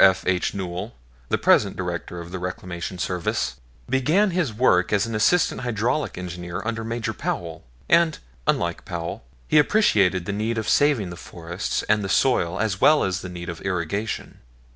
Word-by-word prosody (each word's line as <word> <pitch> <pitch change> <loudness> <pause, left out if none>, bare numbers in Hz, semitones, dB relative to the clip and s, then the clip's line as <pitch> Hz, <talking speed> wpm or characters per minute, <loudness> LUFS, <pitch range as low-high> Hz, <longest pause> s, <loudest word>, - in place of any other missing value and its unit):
F. 95 0 +5
H. 90 +2 0
Newell, 95 +3 -4 0.3
the - - +2
present - - +4
Director 90 - -4
of 85 0 -8
the 95 - -4
Reclamation 90 0 -5
Service, 90 -6 -1 0.3
began 165 +10 +2
his 170 -8 0
work 105 -6 +3
as 105 0 +3
an 115 - -5
assistant 150 +11 +2
hydraulic 120 +4 -1
engineer 90 -1 -5
under 115 0 -2
Major 115 0 -2
Powell; 85 -2 -4 0.2
and, 170 -2 +4 0.3
unlike - - 0
Powell, 85 -6 -5 0.2
he 155 - +5
appreciated 100 - +3
the 100 - -2
need 110 +3 -1
of 110 -1 -2
saving 125 -9 +3
the - - -7
forests 85 +2 -4
and 105 0 +2
the 95 - -3
soil 90 -8 +2
as 105 -3 -1
well 155 0 +6
as 95 -1 -1
the 90 - -6
need 85 -1 -7
of 85 -2 -6
irrigation. 95 +5 -3
100 Hz, 170 wpm, -24 LUFS, 90-115 Hz, 0.3 s, well